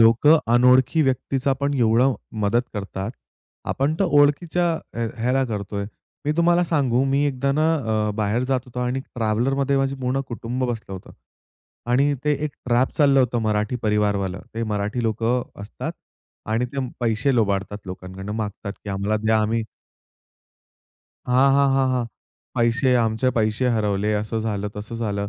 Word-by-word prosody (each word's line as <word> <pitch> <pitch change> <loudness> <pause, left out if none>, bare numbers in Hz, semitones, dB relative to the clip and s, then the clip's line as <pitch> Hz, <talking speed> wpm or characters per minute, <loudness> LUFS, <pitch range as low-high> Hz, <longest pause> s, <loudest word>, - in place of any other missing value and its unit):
लोकं 115 +8 +6
अनोळखी 125 +5 +5
व्यक्तीचा 135 0 0
पण 140 0 0
एवढं 125 +1 +3 0.3
मदत 115 +4 +2
करतात 100 0 -4 0.6
आपण 140 +4 0
तर 195 - +3
ओळखीच्या 155 +3 +3 0.3
ह्या 115 -1 -1
ह्याला 130 +2 +2
करतोय. 100 -3 -4 0.4
मी 150 - +1
तुम्हाला 175 +1 +3
सांगू, 135 -7 +1
मी 135 +1 +2
एकदा 140 0 -1
ना, 155 +3 +2 0.3
अ, - - 0
बाहेर 110 +3 0
जात 130 0 0
होतो 125 -1 -6
आणि 125 +2 -1
ट्रॅव्हलरमध्ये 130 +4 0
माझं 135 0 0
पूर्ण 130 +1 0
कुटुंब 120 +2 -3
बसलं 115 -5 -4
होतं 95 - -9 0.8
आणि 140 +4 +3
ते 150 - +3
एक 150 - -2 0.2
ट्रॅप 125 +2 +2
चाललं 140 -2 +5
होतं 125 -1 +1
मराठी 105 +2 0
परिवारवालं. 105 -3 0
ते 115 - -2
मराठी 105 +2 -2
लोकं 115 +2 0 0.2
असतात 105 - -6 0.6
आणि 115 +3 +1
ते 135 -2 -2
पैसे 120 +3 +1
लुबाडतात 100 -2 0
लोकांकडनं 95 +2 -7
मागतात 105 -1 -4
की 100 - -4
आम्हाला 100 +2 0
द्या 110 0 +3
आम्ही 110 +1 0 1.6
हां, 130 +2 +5
हां, 140 0 +4
हां, 135 0 +3
हां. 125 -2 0 0.5
पैसे 120 +2 +2
आमचे 115 +3 +1
पैसे 110 +3 +1
हरवले, 105 -1 0
असं 105 +2 -2
झालं, 105 -2 -2
तसं 105 +3 -6
झालं. 100 -3 -2
120 Hz, 150 wpm, -23 LUFS, 105-135 Hz, 1.6 s, लोकं